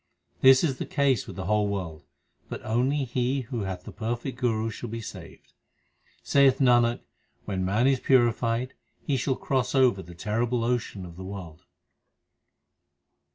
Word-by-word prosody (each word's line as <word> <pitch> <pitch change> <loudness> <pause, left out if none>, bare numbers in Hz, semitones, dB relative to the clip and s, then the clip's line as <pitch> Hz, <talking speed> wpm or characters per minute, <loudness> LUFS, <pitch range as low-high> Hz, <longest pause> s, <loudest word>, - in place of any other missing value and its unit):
This 130 +2 +7
is 135 -6 0
the - - -3
case 140 -6 +1
with - - -8
the 95 - -5
whole 105 -1 +2
world, 90 -6 -5 0.4
but - - -7
only 130 +6 +1
he 130 +2 -1
who 120 -4 -4
hath 90 -2 -5
the - - -9
perfect 120 +3 -4
Guru 115 -3 0
shall 120 +2 -7
be 115 +1 -5
saved. 115 - -11 0.7
Saith 140 -2 +4
Nanak, 120 -3 +3 0.4
when 95 -2 -2
man 105 +6 +1
is 135 -1 +3
purified, 120 -1 +2 0.3
he 140 - +1
shall 130 +1 0
cross 130 0 -1
over 125 -7 +4
the 85 -1 -12
terrible 115 +6 -1
ocean 115 -5 -2
of 85 -1 -11
the 95 - -7
world. 90 -3 -9
120 Hz, 155 wpm, -26 LUFS, 100-130 Hz, 0.7 s, This